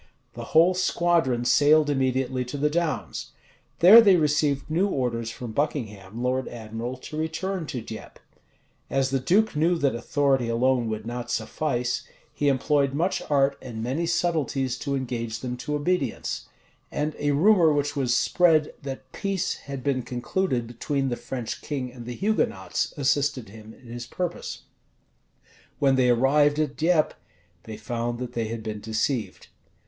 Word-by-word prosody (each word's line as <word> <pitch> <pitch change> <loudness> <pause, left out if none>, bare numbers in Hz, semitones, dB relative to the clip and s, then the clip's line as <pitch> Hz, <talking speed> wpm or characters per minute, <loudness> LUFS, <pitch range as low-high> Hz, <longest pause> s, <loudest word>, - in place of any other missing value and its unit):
The - - -7
whole 170 +3 +6
squadron 170 -9 +1
sailed 150 +3 +5
immediately 130 -2 0
to 125 +4 -5
the 150 +1 +1
Downs. 170 -2 -2 0.5
There 205 +7 +10
they 200 -4 +6
received 150 -3 +1
new 170 +6 +1
orders 120 - -2
from 115 0 -7
Buckingham, 110 -6 -3
lord 130 +1 0
admiral, 115 +2 -6
to 140 - -9
return 165 +2 -3
to 125 - -4
Dieppe. 110 -1 -9 0.7
As 135 -1 +1
the 135 - +1
duke 190 - +2
knew 165 +3 +2
that 140 -4 +1
authority 135 +1 +1
alone 120 0 +2
would 110 0 -4
not 120 +1 -5
suffice, 125 +1 -1 0.3
he 145 - -1
employed 140 0 +2
much 175 +5 0
art 140 -1 +2
and 115 -3 -6
many 140 +8 -1
subtleties 155 -7 0
to 140 -1 -2
engage 120 -4 -3
them 125 -1 -3
to 150 +4 -3
obedience; 145 -4 -2 0.4
and 150 +1 -2
a 145 - 0
rumor 165 +3 +5
which 145 0 0
was 130 -3 +1
spread, 160 -2 +3
that 135 -2 -7
peace 195 -3 -1
had 140 -2 -8
been 135 -1 0
concluded 125 +2 -2
between 135 +4 -2
the 120 - -1
French 120 -1 -5
king 130 -4 -4
and 120 -2 -10
the 125 - -5
Hugonots, 190 - 0
assisted 140 -4 0
him 110 +1 -12
in 130 - -20
his 120 0 -7
purpose. 180 -2 -4 1.1
When 135 -2 +3
they 130 -1 +3
arrived 145 +4 +4
at 150 -2 -1
Dieppe, 160 -1 +2 0.5
they 110 -1 -7
found 120 +1 -3
that 125 0 -6
they 115 -2 -2
had 115 0 -5
been 110 -1 -4
deceived. 110 -2 -2
135 Hz, 155 wpm, -25 LUFS, 120-155 Hz, 1.1 s, There